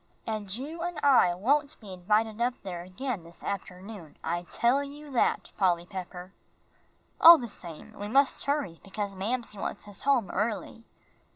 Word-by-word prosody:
And 215 Hz, -3 st, -3 dB
you 300 Hz, +7 st, -6 dB
and 345 Hz, -2 st, -3 dB
I 255 Hz, -11 st, +5 dB
won't 280 Hz, +9 st, +1 dB
be 205 Hz, -4 st, -10 dB
invited 215 Hz, +5 st, 0 dB
up 245 Hz, +1 st, +1 dB
there 180 Hz, -3 st, -5 dB
again 185 Hz, +3 st, -4 dB
this 170 Hz, +1 st, -15 dB
afternoon, 190 Hz, -3 st, -6 dB
I 175 Hz, +1 st, -2 dB
tell 255 Hz, +4 st, +2 dB
you 290 Hz, +1 st, -10 dB
that, 250 Hz, -, +1 dB
Polly 175 Hz, -3 st, +2 dB
Pepper. 185 Hz, -1 st, -8 dB, 0.9 s
All 335 Hz, +1 st, +11 dB
the 245 Hz, -5 st, -5 dB
same, 175 Hz, 0 st, -10 dB
we 205 Hz, -1 st, -6 dB
must 270 Hz, +5 st, +3 dB
hurry, 280 Hz, -, -1 dB
because 200 Hz, 0 st, -4 dB
Mamsie 215 Hz, +2 st, -3 dB
wants -, -, -5 dB
us 205 Hz, -, -9 dB
home 260 Hz, -9 st, +2 dB
early." 220 Hz, +2 st, -2 dB
210 Hz, 160 wpm, -28 LUFS, 185-260 Hz, 0.9 s, All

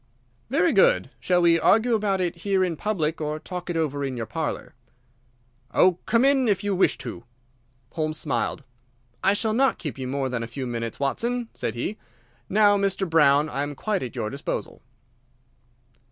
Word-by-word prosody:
"Very 325 Hz, +6 st, +2 dB
good. -, -, +4 dB
Shall 180 Hz, -1 st, +2 dB
we 165 Hz, -1 st, +5 dB
argue 225 Hz, +6 st, +3 dB
about 205 Hz, -3 st, +1 dB
it 175 Hz, -1 st, -2 dB
here 190 Hz, +1 st, +1 dB
in 175 Hz, -3 st, -1 dB
public 165 Hz, -5 st, -2 dB
or 150 Hz, 0 st, -2 dB
talk 180 Hz, +3 st, -7 dB
it 170 Hz, -, -1 dB
over 145 Hz, -3 st, -1 dB
in 135 Hz, -2 st, -3 dB
your 115 Hz, -, -3 dB
parlour?" 160 Hz, +5 st, -4 dB, 1.0 s
"Oh, 180 Hz, -1 st, +4 dB
come 235 Hz, +3 st, +3 dB
in 270 Hz, -2 st, +4 dB
if 200 Hz, -1 st, +1 dB
you 205 Hz, -1 st, 0 dB
wish 185 Hz, -, +2 dB
to." 115 Hz, -, -7 dB, 0.7 s
Holmes 155 Hz, -1 st, -2 dB
smiled. 150 Hz, -1 st, -2 dB, 0.6 s
"I 195 Hz, +1 st, +4 dB
shall 220 Hz, +1 st, 0 dB
not 260 Hz, -1 st, +2 dB
keep 145 Hz, -7 st, -6 dB
you 130 Hz, -, -4 dB
more 135 Hz, +1 st, -1 dB
than 125 Hz, -2 st, -3 dB
a 115 Hz, -, -4 dB
few 130 Hz, +3 st, -5 dB
minutes, 115 Hz, -1 st, -4 dB
Watson," 235 Hz, -, -1 dB
said 115 Hz, -, -3 dB
he. 195 Hz, -, -4 dB, 0.5 s
"Now, 205 Hz, 0 st, +4 dB
Mr. 195 Hz, -1 st, 0 dB
Brown, 150 Hz, -2 st, +4 dB
I 140 Hz, -2 st, -3 dB
am 145 Hz, 0 st, -3 dB
quite 205 Hz, +6 st, -1 dB
at 125 Hz, -, -6 dB
your 105 Hz, -, -3 dB
disposal." 140 Hz, +1 st, -5 dB
170 Hz, 180 wpm, -25 LUFS, 140-205 Hz, 1.0 s, we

